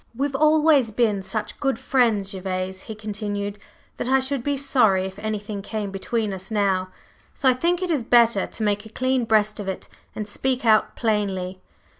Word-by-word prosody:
"We've 275 Hz, +2 st, -1 dB
always 305 Hz, -3 st, +4 dB
been 215 Hz, -2 st, +1 dB
such 215 Hz, +2 st, -5 dB
good 270 Hz, -1 st, 0 dB
friends, 225 Hz, -7 st, +1 dB
Gervase," 185 Hz, 0 st, -4 dB
he 220 Hz, -, -8 dB
continued, 205 Hz, -1 st, -4 dB, 0.4 s
"that -, -, -3 dB
I 265 Hz, -, +5 dB
should 265 Hz, 0 st, -2 dB
be 285 Hz, +1 st, 0 dB
sorry 225 Hz, -9 st, +3 dB
if 190 Hz, +1 st, -7 dB
anything 210 Hz, -1 st, -4 dB
came 210 Hz, -1 st, -4 dB
between 210 Hz, +2 st, -2 dB
us 190 Hz, 0 st, -7 dB
now, 195 Hz, -4 st, +1 dB, 0.5 s
so 270 Hz, -, 0 dB
I 260 Hz, -, +7 dB
think 345 Hz, +8 st, 0 dB
it 360 Hz, -, -1 dB
is 295 Hz, -5 st, +1 dB
better 230 Hz, -3 st, +4 dB
to 220 Hz, -, -6 dB
make 205 Hz, 0 st, 0 dB
a 220 Hz, -, -11 dB
clean 255 Hz, +1 st, 0 dB
breast 215 Hz, -1 st, +2 dB
of 205 Hz, -, -5 dB
it 190 Hz, -, -4 dB, 0.3 s
and 215 Hz, -, -4 dB
speak 255 Hz, +4 st, -1 dB
out 215 Hz, -1 st, +4 dB
plainly." 195 Hz, -5 st, -1 dB
215 Hz, 185 wpm, -23 LUFS, 200-255 Hz, 0.5 s, I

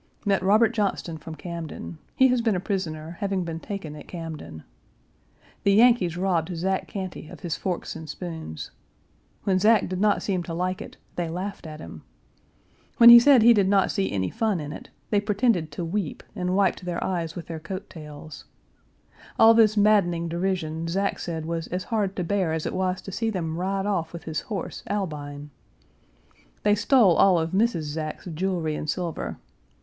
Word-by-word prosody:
Met 200 Hz, -2 st, +2 dB
Robert 215 Hz, +4 st, +4 dB
Johnston 200 Hz, -7 st, -2 dB
from 160 Hz, +1 st, -8 dB
Camden. 160 Hz, -, -7 dB, 0.2 s
He 260 Hz, 0 st, +5 dB
has 250 Hz, -1 st, +2 dB
been 225 Hz, -3 st, +1 dB
a -, -, 0 dB
prisoner, 170 Hz, -4 st, -4 dB
having 195 Hz, -2 st, -1 dB
been 165 Hz, -1 st, -5 dB
taken 195 Hz, -6 st, -6 dB
at 150 Hz, -, -11 dB
Camden. 160 Hz, -, -7 dB, 1.0 s
The 200 Hz, -, +3 dB
Yankees 215 Hz, -6 st, +4 dB
robbed 180 Hz, -2 st, 0 dB
Zack 190 Hz, +3 st, -1 dB
Cantey 185 Hz, -5 st, -6 dB
of -, -, -11 dB
his 175 Hz, -5 st, -2 dB
forks 180 Hz, -3 st, -3 dB
and 160 Hz, -1 st, -8 dB
spoons. 160 Hz, -, -6 dB, 0.7 s
When 190 Hz, -2 st, +2 dB
Zack 215 Hz, +1 st, +4 dB
did 185 Hz, +1 st, -3 dB
not 210 Hz, -1 st, +2 dB
seem 190 Hz, -3 st, 0 dB
to 170 Hz, -1 st, -5 dB
like 180 Hz, +2 st, -2 dB
it, -, -, -10 dB, 0.2 s
they 175 Hz, -2 st, -1 dB
laughed 185 Hz, +1 st, -5 dB
at 155 Hz, 0 st, -8 dB
him. -, -, -9 dB, 1.0 s
When 235 Hz, 0 st, +10 dB
he 235 Hz, -, +12 dB
said 255 Hz, -2 st, +6 dB
he 235 Hz, +1 st, +8 dB
did 200 Hz, -4 st, +3 dB
not 195 Hz, -1 st, +3 dB
see 195 Hz, -2 st, -1 dB
any 95 Hz, -2 st, -1 dB
fun 215 Hz, -5 st, 0 dB
in 150 Hz, -1 st, -6 dB
it, -, -, -10 dB, 0.2 s
they 205 Hz, -2 st, +3 dB
pretended 205 Hz, -, +1 dB
to 170 Hz, -, -4 dB
weep 175 Hz, -2 st, -3 dB
and 180 Hz, -2 st, -1 dB
wiped 195 Hz, -2 st, +2 dB
their 175 Hz, -1 st, -3 dB
eyes 170 Hz, -3 st, -2 dB
with 170 Hz, -, -6 dB
their 165 Hz, -1 st, -6 dB
coat 190 Hz, +5 st, -6 dB
tails. 150 Hz, -1 st, -10 dB, 0.9 s
All 225 Hz, 0 st, +8 dB
this 220 Hz, -2 st, +4 dB
maddening 195 Hz, -5 st, +3 dB
derision 165 Hz, -2 st, -2 dB
Zack 195 Hz, +4 st, -1 dB
said 160 Hz, -2 st, -4 dB
was 165 Hz, 0 st, -3 dB
as 180 Hz, +1 st, -3 dB
hard 205 Hz, -4 st, -1 dB
to 180 Hz, -, -2 dB
bear 180 Hz, -2 st, 0 dB
as 160 Hz, -1 st, -2 dB
it -, -, -2 dB
was 185 Hz, 0 st, -1 dB
to 195 Hz, -, -7 dB
see 225 Hz, +4 st, -1 dB
them 165 Hz, -6 st, -3 dB
ride 195 Hz, +3 st, -1 dB
off 175 Hz, -6 st, -1 dB
with 170 Hz, -, -7 dB
his 160 Hz, 0 st, -3 dB
horse, 200 Hz, -6 st, -5 dB
Albine. 150 Hz, -7 st, -4 dB, 1.1 s
They 205 Hz, -, +4 dB
stole 210 Hz, -3 st, +4 dB
all 190 Hz, -3 st, +5 dB
of 165 Hz, 0 st, -1 dB
Mrs. 205 Hz, -4 st, +1 dB
Zack's 155 Hz, +1 st, -5 dB
jewelry 170 Hz, -2 st, -1 dB
and 150 Hz, -, -5 dB
silver. 160 Hz, -, -3 dB
180 Hz, 185 wpm, -25 LUFS, 160-200 Hz, 1.1 s, he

